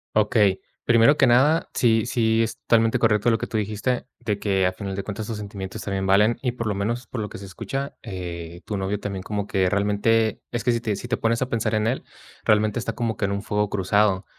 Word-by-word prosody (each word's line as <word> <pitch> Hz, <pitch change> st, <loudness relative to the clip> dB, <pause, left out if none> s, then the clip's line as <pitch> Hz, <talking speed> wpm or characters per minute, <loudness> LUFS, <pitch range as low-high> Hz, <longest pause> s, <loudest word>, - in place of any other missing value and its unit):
Okey, 105 Hz, -2 st, +3 dB, 0.2 s
primero 115 Hz, +4 st, +5 dB
que 145 Hz, -, +4 dB
nada, 135 Hz, +6 st, +4 dB
sí 115 Hz, -3 st, +3 dB
sí, 115 Hz, -2 st, +2 dB
es 115 Hz, -, -3 dB
totalmente 115 Hz, -1 st, +3 dB
correcto 110 Hz, 0 st, +3 dB
lo 115 Hz, -, +3 dB
que -, -, -4 dB
tú -, -, -7 dB
dijiste, 110 Hz, +4 st, -1 dB
de 105 Hz, -2 st, -2 dB
que 95 Hz, -2 st, +1 dB
al 90 Hz, -, +1 dB
final 100 Hz, 0 st, -5 dB
de 100 Hz, 0 st, -3 dB
cuentas 105 Hz, +1 st, -5 dB
tus 110 Hz, -2 st, -4 dB
sentimientos 100 Hz, 0 st, -6 dB
también 95 Hz, -1 st, -2 dB
valen 105 Hz, +4 st, +4 dB
y 125 Hz, -, 0 dB
por 115 Hz, -2 st, -4 dB
lo 105 Hz, -, -1 dB
menos, 115 Hz, +5 st, -2 dB
por 115 Hz, -, -4 dB
lo 105 Hz, -, -4 dB
que -, -, -8 dB
se 100 Hz, -, -9 dB
escucha, 135 Hz, +9 st, -5 dB
eh, 85 Hz, -5 st, -6 dB
tu 105 Hz, -, -3 dB
novio 100 Hz, +1 st, -2 dB
también 100 Hz, -2 st, -5 dB
como 105 Hz, 0 st, -3 dB
que 95 Hz, -3 st, +1 dB
realmente 105 Hz, +3 st, +1 dB
Es 120 Hz, -2 st, -3 dB
que 120 Hz, -, +3 dB
si 115 Hz, -, -1 dB
te 110 Hz, -4 st, -1 dB
si 120 Hz, -, -7 dB
te 125 Hz, -, 0 dB
pones 115 Hz, +1 st, 0 dB
a 130 Hz, -, +1 dB
pensar 110 Hz, -3 st, -1 dB
en 110 Hz, +1 st, +1 dB
él, 125 Hz, -, -1 dB, 0.4 s
realmente 105 Hz, 0 st, +2 dB
está 120 Hz, -, -2 dB
como 115 Hz, -4 st, -2 dB
que -, -, -5 dB
en 100 Hz, -, +1 dB
un 100 Hz, 0 st, -2 dB
fuego 105 Hz, -1 st, -1 dB
cruzado. 100 Hz, 0 st, +2 dB
105 Hz, 240 wpm, -24 LUFS, 100-115 Hz, 0.4 s, primero